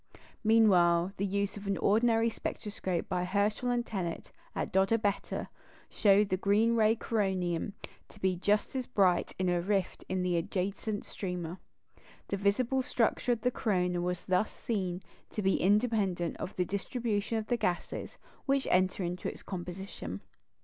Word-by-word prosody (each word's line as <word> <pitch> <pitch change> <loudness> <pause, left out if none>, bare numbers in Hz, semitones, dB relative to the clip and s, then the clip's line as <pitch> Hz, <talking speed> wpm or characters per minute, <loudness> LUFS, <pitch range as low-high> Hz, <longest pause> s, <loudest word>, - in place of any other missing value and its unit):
Meanwhile, 190 -5 +5
the 200 - 0
use 200 +1 -1
of 200 0 -8
an 195 -2 0
ordinary 225 +2 +3
spectroscope 200 -5 -3
by 180 -2 -1
Herschel 205 +6 0
and 240 -1 +1
Tennant 185 -7 -4 0.2
at - - -3
Dodabetta 200 +1 +1 0.4
showed 200 0 +4
the 185 - +1
green 210 +4 +3
ray 220 -1 +5
of - - -7
coronium 190 -5 -1 0.4
to - - -16
be 190 -2 +1
just 205 +7 +1
as 255 -2 -2
bright 190 -7 +2
in 185 - 0
a 175 -1 +2
rift 195 0 0
as - - -15
in 185 0 0
the 180 -1 +1
adjacent 200 +4 -2
streamer. 180 -2 -5 0.7
The 200 - -1
visible 230 +7 +2
structure 245 0 +1
of 230 - -4
the 250 - +2
corona 180 -6 0
was 180 0 -2
thus 185 +3 +1
seen 185 -5 -3 0.3
to 210 - -4
be 190 0 +2
independent 200 -4 +2
of 185 - -6
the 180 - +1
distribution 210 +2 -2
of 220 - -2
the 240 +2 0
gases 180 -6 -2 0.3
which 275 0 +2
enter 185 +1 +2
into 175 +1 -3
its - - -10
composition. 180 - -6
200 Hz, 160 wpm, -31 LUFS, 180-220 Hz, 0.7 s, Meanwhile